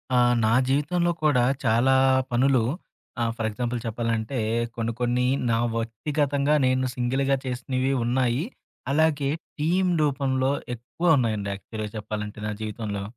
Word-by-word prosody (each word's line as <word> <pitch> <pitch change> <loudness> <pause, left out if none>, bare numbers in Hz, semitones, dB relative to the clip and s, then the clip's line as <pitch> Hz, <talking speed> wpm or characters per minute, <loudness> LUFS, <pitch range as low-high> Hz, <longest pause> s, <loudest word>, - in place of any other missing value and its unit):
ఆ! - - +4 0.3
నా 110 - +3 0.2
జీవితంలో 165 +6 +1
కూడా 140 -5 +4 0.2
చాలా 120 +3 +3 0.4
పనులు 130 +1 +3 0.6
ఆ! - - +3
ఫర్ 110 -2 -1
ఎగ్జాంపుల్ 120 +2 -3
చెప్పాలంటే 115 +2 -2 0.4
కొన్ని 115 0 -1
కొన్ని 125 +1 +1 0.2
నా 115 - +2 0.2
వ్యక్తిగతంగా 140 +5 0
నేను 130 0 +2
సింగిల్‌గా 135 +2 +1
చేసినవి 130 +1 -1
ఉన్నాయి. 125 +2 +1 0.5
అలాగే 145 -2 +2 0.3
టీమ్ 180 +4 +2
రూపంలో 135 -2 +1 0.2
ఎక్కువ 160 +8 +1
ఉన్నాయండి 110 -5 -1
యాక్చువల్‌గా 110 +1 -6
చెప్పాలంటే 105 0 -5
నా - - -2
జీవితంలో. 105 -2 -4
125 Hz, 125 wpm, -25 LUFS, 115-140 Hz, 0.6 s, ఆ